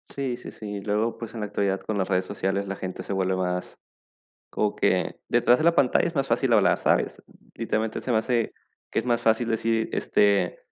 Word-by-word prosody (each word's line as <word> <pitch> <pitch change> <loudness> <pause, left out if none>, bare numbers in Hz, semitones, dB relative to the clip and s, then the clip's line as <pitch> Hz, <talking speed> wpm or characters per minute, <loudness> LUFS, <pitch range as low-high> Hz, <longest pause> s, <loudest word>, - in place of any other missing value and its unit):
Sí, 130 -3 -2
sí, - - -9
sí, 110 - -11
y - - -6
luego 105 +3 -1
pues 115 -1 -7
en 115 - -5
la 105 - -2
actualidad 100 -1 -1
con 110 - -3
las 95 - 0
redes 95 -1 +1
sociales 100 0 -2
la 100 0 -5
gente 95 -1 -5
se - - -7
vuelve 95 -1 0
más, 90 -1 -3 0.7
como 105 -1 -1
que - - 0
detrás 125 - +4
de - - -1
la 170 0 +5
pantalla 130 +5 +3
es 170 - -4
más 135 -2 0
fácil 120 +2 +1
hablar, 105 -3 +4
¿sabes? - - +1 0.3
Literalmente 110 -1 -2
se 130 - -5
me 115 - +3
hace 115 0 0 0.4
que - - -1
es - - -10
más 120 -1 +1
fácil 115 +1 +2
decir, 115 0 0
este, 100 -3 +2
110 Hz, 220 wpm, -25 LUFS, 100-120 Hz, 0.7 s, la